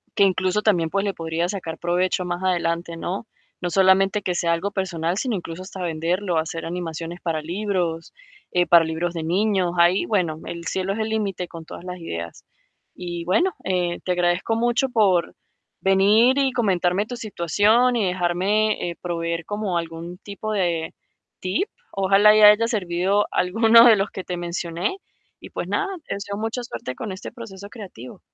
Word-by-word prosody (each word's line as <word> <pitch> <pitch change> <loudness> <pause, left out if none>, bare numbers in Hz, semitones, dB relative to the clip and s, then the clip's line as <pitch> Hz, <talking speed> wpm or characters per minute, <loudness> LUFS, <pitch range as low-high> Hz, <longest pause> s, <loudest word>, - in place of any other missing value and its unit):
que - - +4
incluso 185 +1 +2
también, 175 -7 +2
pues, 200 +2 0
le 200 - -1
podrías 165 +1 -2
sacar 165 -5 -5
provecho, 180 +1 0
más 175 +1 -3
adelante, 170 -2 -1
¿no? 185 +6 -4 0.3
No 175 - -2
solamente, 190 +2 +4
que 180 -1 -2
sea 170 -1 +1
algo 195 +5 -2
personal, 175 -3 -2
sino 240 0 -1
incluso, 175 -1 -6
hasta 190 0 -8
venderlo, 175 +2 -1
hacer 160 +1 -3
animaciones 170 0 -5
para 160 -3 -2
libros, 175 -1 -2 0.4
eh, 180 0 +2
para 170 -1 +6
libros 160 +2 -2
de 165 - -3
niños. 185 +1 +1
Ahí, 175 +2 +4
bueno, 175 -7 0
el 170 0 -7
cielo 190 +2 -1
es 215 - -5
el 220 0 -1
límite, 200 -5 -2
con 165 -2 -10
todas 170 - -10
las 180 0 -6
ideas. 85 - -7 0.5
Y 175 -1 -5
bueno, 350 - +2
eh, 180 -2 -1
te 185 - 0
agradezco 175 +5 +1
mucho 240 +3 +1
por 200 -8 +2 0.5
venir, 210 +7 +4
y 270 -1 +2
comentarme 195 -4 +1
tu 245 - -6
situación, 220 +4 +2
y 220 - +1
dejarme, 185 +3 +1
eh, 170 - -6
proveer, 170 -1 -3
como 205 -4 -2
algún 165 +1 -6
tipo 205 +2 -6
de 170 -5 -1 0.4
tip. 255 - -1 0.2
Ojalá 195 +2 +4
haya 210 +1 +7
servido 195 -2 0
alguno 225 +5 +5
de 230 -3 +8
los 195 +1 -1
que 190 - -7
te 180 - -4
mencioné, 175 - -3 0.4
y - - -12
pues - - -4
nada, 405 - 0 0.2
te - - -2
deseo 200 0 -5
mucha 225 +3 -3
suerte 130 - -6
con 215 - -5
este 190 - -7
proceso 200 -4 -10
creativo. 185 - -10
185 Hz, 175 wpm, -23 LUFS, 170-210 Hz, 0.5 s, de